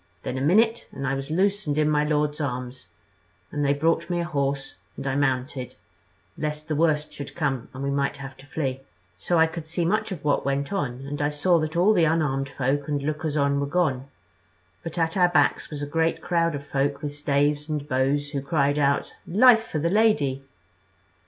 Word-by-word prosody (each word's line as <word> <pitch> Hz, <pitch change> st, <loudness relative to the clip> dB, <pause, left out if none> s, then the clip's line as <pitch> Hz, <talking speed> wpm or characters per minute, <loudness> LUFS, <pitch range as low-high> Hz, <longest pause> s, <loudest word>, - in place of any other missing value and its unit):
Then -, -, -3 dB
a 130 Hz, -, -2 dB
minute, 225 Hz, -, +3 dB
and 135 Hz, -, -5 dB
I 130 Hz, -, 0 dB
was 135 Hz, +1 st, -4 dB
loose 195 Hz, +3 st, +1 dB
and 145 Hz, 0 st, 0 dB
in 155 Hz, 0 st, +3 dB
my 150 Hz, -1 st, +2 dB
lord's 150 Hz, 0 st, 0 dB
arms, 125 Hz, -4 st, -4 dB, 0.6 s
and 145 Hz, -1 st, -2 dB
they 140 Hz, 0 st, +2 dB
brought 165 Hz, +4 st, +1 dB
me 175 Hz, -1 st, 0 dB
a -, -, 0 dB
horse 140 Hz, -4 st, -2 dB, 0.2 s
and -, -, -6 dB
I 135 Hz, -, 0 dB
mounted, 130 Hz, -2 st, -1 dB, 0.6 s
lest 150 Hz, 0 st, -4 dB
the 155 Hz, -, -1 dB
worst 150 Hz, -1 st, +1 dB
should 140 Hz, -, -8 dB
come 135 Hz, -7 st, -2 dB
and 130 Hz, +1 st, -7 dB
we 140 Hz, -, -1 dB
might 140 Hz, +1 st, 0 dB
have 135 Hz, -1 st, -8 dB
to 135 Hz, -, -15 dB
flee. 135 Hz, -3 st, -2 dB, 0.4 s
So 170 Hz, -, +1 dB
I 160 Hz, -, +6 dB
could 160 Hz, -1 st, -6 dB
see 165 Hz, +1 st, -1 dB
much 215 Hz, +4 st, 0 dB
of 165 Hz, -6 st, -6 dB
what 145 Hz, -, +2 dB
went 140 Hz, +4 st, -1 dB
on; 135 Hz, -8 st, -3 dB
and 145 Hz, +1 st, -4 dB
I 145 Hz, -, +2 dB
saw 165 Hz, +4 st, +2 dB
that 155 Hz, +2 st, -2 dB
all 195 Hz, +5 st, +5 dB
the 175 Hz, -5 st, +4 dB
unarmed 145 Hz, -4 st, 0 dB
folk 135 Hz, +1 st, -1 dB
and 145 Hz, -2 st, -1 dB
lookers 150 Hz, 0 st, -2 dB
on 140 Hz, -1 st, +2 dB
were 140 Hz, -, -1 dB
gone, 140 Hz, -5 st, 0 dB, 0.7 s
but 165 Hz, +1 st, -7 dB
at 165 Hz, -1 st, 0 dB
our 180 Hz, -2 st, +4 dB
backs 175 Hz, -, +2 dB
was 145 Hz, -2 st, -5 dB
a -, -, -1 dB
great 160 Hz, +3 st, 0 dB
crowd 170 Hz, -2 st, 0 dB
of 140 Hz, 0 st, -7 dB
folk 140 Hz, +1 st, -1 dB
with 145 Hz, -1 st, -3 dB
staves 145 Hz, +1 st, 0 dB
and 150 Hz, -2 st, -3 dB
bows 145 Hz, +2 st, 0 dB
who 140 Hz, -2 st, -2 dB
cried 145 Hz, 0 st, +1 dB
out, 140 Hz, -1 st, +1 dB
'Life 225 Hz, +4 st, +5 dB
for -, -, -3 dB
the 165 Hz, +3 st, 0 dB
Lady!' 170 Hz, -11 st, +2 dB
145 Hz, 210 wpm, -25 LUFS, 140-165 Hz, 0.7 s, I